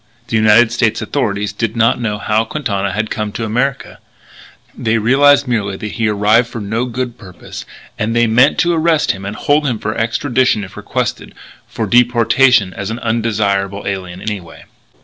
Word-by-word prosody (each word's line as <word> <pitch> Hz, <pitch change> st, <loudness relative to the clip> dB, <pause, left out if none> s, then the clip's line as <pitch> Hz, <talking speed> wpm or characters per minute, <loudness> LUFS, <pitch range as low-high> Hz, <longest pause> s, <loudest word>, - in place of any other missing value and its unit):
The -, -, -1 dB
United 110 Hz, +2 st, +5 dB
States 120 Hz, -2 st, +1 dB
authorities 105 Hz, -6 st, -2 dB
did 115 Hz, +1 st, -3 dB
not 115 Hz, +1 st, +2 dB
know 105 Hz, -3 st, -2 dB
why 110 Hz, +2 st, 0 dB
Quintana 100 Hz, -10 st, -2 dB
had 110 Hz, +3 st, -3 dB
come 105 Hz, -2 st, -3 dB
to 115 Hz, -, -3 dB
America. 125 Hz, +5 st, -2 dB, 0.8 s
They 115 Hz, -1 st, 0 dB
realised 140 Hz, +5 st, +4 dB
merely 100 Hz, -5 st, -1 dB
that 105 Hz, +1 st, -6 dB
he 115 Hz, -2 st, -1 dB
arrived 105 Hz, +3 st, +3 dB
for 115 Hz, -, -7 dB
no 110 Hz, +4 st, -2 dB
good 125 Hz, 0 st, -5 dB
purpose; 90 Hz, -4 st, -10 dB, 0.3 s
and 110 Hz, +1 st, -1 dB
they 120 Hz, -, +3 dB
had 115 Hz, -2 st, +2 dB
meant 125 Hz, +5 st, +4 dB
to 175 Hz, 0 st, +1 dB
arrest 160 Hz, -1 st, +2 dB
and 95 Hz, +2 st, -7 dB
hold 145 Hz, 0 st, +1 dB
him 120 Hz, -4 st, -1 dB
for 110 Hz, 0 st, -3 dB
extradition 120 Hz, -1 st, 0 dB
if 95 Hz, -, -10 dB
requested; -, -, -4 dB, 0.3 s
for -, -, -4 dB
deportation 120 Hz, -3 st, +3 dB
as 100 Hz, -2 st, -5 dB
an 115 Hz, -, -4 dB
undesirable 105 Hz, -4 st, -1 dB
alien 95 Hz, -2 st, -5 dB
anyway. 100 Hz, -6 st, -6 dB
110 Hz, 170 wpm, -16 LUFS, 105-125 Hz, 0.8 s, United